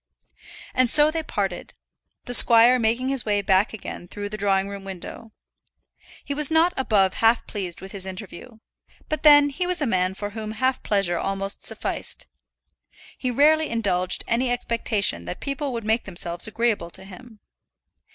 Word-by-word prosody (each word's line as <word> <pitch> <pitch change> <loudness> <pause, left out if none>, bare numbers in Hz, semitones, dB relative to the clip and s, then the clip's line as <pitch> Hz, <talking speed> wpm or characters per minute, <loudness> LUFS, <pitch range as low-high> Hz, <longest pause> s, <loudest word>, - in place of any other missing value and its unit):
And 255 -1 +2
so 300 +3 +6
they 325 0 -3
parted, 195 - -5 0.5
the 245 - -4
squire 240 +1 +8
making 235 +3 0
his 270 -2 -1
way 205 -1 -1
back 190 +1 +2
again 200 -4 -9
through 205 +2 -7
the 215 - -6
drawing 195 -1 0
room 200 -1 -8
window. 195 +4 -9 0.9
He 285 - -4
was 295 0 -1
not 325 +3 +2
above 205 -7 +1
half 225 +1 +2
pleased 185 -5 -6
with 190 0 -9
his 190 -1 -5
interview; 195 +4 -10 0.5
but 310 -1 -3
then 290 -1 +6
he 355 +6 -3
was 360 -1 +1
a 295 - 0
man 185 -4 -1
for 205 +1 -6
whom 215 0 -6
half 260 +3 -1
pleasure 195 -4 -1
almost 195 0 -4
sufficed. - - -2 0.9
He 255 - -4
rarely 305 +5 +3
indulged 195 -6 0
any 245 +2 0
expectation 220 - 0
that 90 - -7
people 280 0 -4
would 230 -3 -5
make 220 +2 0
themselves 175 -1 -1
agreeable 215 -6 -1
to 190 - -6
him. 210 +4 -14
220 Hz, 165 wpm, -23 LUFS, 195-255 Hz, 0.9 s, squire